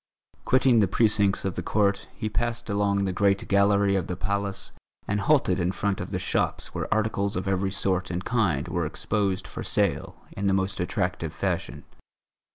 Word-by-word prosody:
Quitting 130 -2 +4
the 100 - +4
precincts 100 -1 +2
of 95 - -1
the 90 - -4
court, 100 +2 +1
he 110 - -3
passed 120 +1 -2
along 100 -1 +1
the 95 - -1
great 100 +1 +1
gallery 100 0 +3
of 95 -4 -1
the 90 - -3
Palace 100 +1 -2 0.4
and 105 - 0
halted 100 -6 +2
in 90 0 +1
front 100 0 -1
of - - -5
the - - -2
shops - - -1
where - - -4
articles 105 -2 0
of 90 +1 -3
every 95 0 +1
sort 95 -1 -1
and 90 +1 -4
kind 95 - +1
were 85 -1 -1
exposed 100 +2 -1
for - - -7
sale - - 0 0.2
in 100 0 -2
the 95 - +3
most 95 0 -1
attractive 90 -2 -2
fashion. - - -2
100 Hz, 180 wpm, -26 LUFS, 95-105 Hz, 0.4 s, Quitting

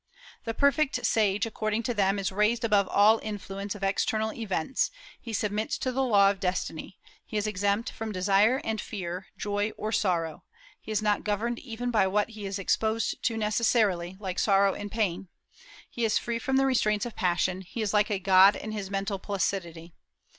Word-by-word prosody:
The 225 -1 -3
perfect 280 +1 +2
sage, 210 -2 +2
according 215 0 -2
to 245 - -1
them, 200 -2 +1
is 195 -1 -2
raised 210 +4 +1
above 205 -4 +3
all 215 +4 +5
influence 200 -1 -5
of 200 - -9
external 215 +2 0
events; 215 +1 -1 0.3
he 230 - -7
submits 210 +1 -1
to 255 - -2
the 265 +2 -1
law 200 -6 +5
of 200 - -7
destiny; 180 -1 -3 0.3
he 215 - -5
is 210 - 0
exempt 205 +2 0
from 220 -1 -5
desire 200 +6 +3
and 220 -1 -2
fear, 185 -2 -6
joy 205 +1 -1
or 215 - -3
sorrow; 170 -7 0 0.4
he - - -8
is 215 0 0
not 210 -1 +1
governed 225 +3 -1
even 245 0 -4
by 210 -4 +3
what 210 +3 +1
he 215 -3 -7
is 195 +1 -3
exposed 220 +3 0
to 225 -1 0
necessarily, 210 -4 +1
like 190 -3 -4
sorrow 195 -1 +3
and 205 0 -7
pain; 195 -4 -1 0.6
he 235 - -5
is 220 - +2
free 235 -1 -2
from 265 +3 0
the 270 - +3
restraints 215 -4 +1
of 240 - -7
passion; 185 +1 0
he 215 +5 -5
is 210 - -2
like 210 0 +3
a 205 - 0
god 190 +1 +6
in 215 - -6
his 205 -3 -5
mental 195 0 -2
placidity. 175 -4 -3
210 Hz, 190 wpm, -28 LUFS, 195-225 Hz, 0.6 s, god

